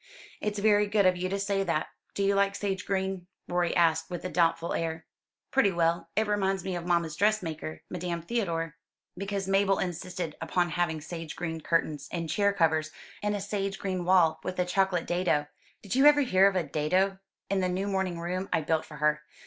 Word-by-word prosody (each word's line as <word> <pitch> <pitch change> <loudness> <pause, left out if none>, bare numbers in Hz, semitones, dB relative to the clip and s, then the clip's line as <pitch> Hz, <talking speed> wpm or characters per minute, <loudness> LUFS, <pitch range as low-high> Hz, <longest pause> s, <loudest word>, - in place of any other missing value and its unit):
"It's 210 0 -2
very 205 0 +4
good 205 -1 +2
of 185 0 +5
you 180 +1 -2
to 200 - -1
say 200 0 0
that. 165 -4 -1 0.3
Do 200 - 0
you 200 0 +3
like 200 0 +2
sage 195 -3 -3
green?" 190 -2 -2 0.2
Rorie 175 -1 0
asked 160 -2 +3
with 175 -1 -5
a - - -1
doubtful 165 -1 +1
air. 160 -1 -3 0.5
"Pretty 265 -7 +4
well. 170 -1 0
It 220 +2 +2
reminds 195 -3 0
me 190 -1 -3
of 175 0 -5
mamma's 170 -3 +1
dress 210 +2 +2
maker, 155 -1 -6
Madame 175 -1 -4
Theodore." 165 -7 -2 0.4
"Because 195 0 -3
Mabel 195 0 +3
insisted 175 -2 -4
upon 175 -2 0
having 160 -2 -1
sage 165 0 -7
green 160 -2 -4
curtains, 150 -3 -1
and 165 -3 -3
chair 200 +2 +3
covers, 160 -4 +2 0.3
and 210 0 0
a - - -2
sage 195 0 -2
green 185 -2 -2
wall 175 -3 +4
with 185 - -4
a 180 - +2
chocolate 185 -1 +1
dado 175 -4 +1 0.4
did 200 - -4
you 270 +3 +6
ever 295 0 +7
hear 195 -7 +5
of 200 - 0
a 180 - +2
dado? 185 +6 0 0.3
in 195 - +2
the 185 -1 +1
new 185 +2 -1
morning 190 -3 -1
room 180 +3 -3
I - - +2
built 160 +1 0
for 150 - -11
her. 150 0 +2
180 Hz, 205 wpm, -28 LUFS, 165-195 Hz, 0.5 s, ever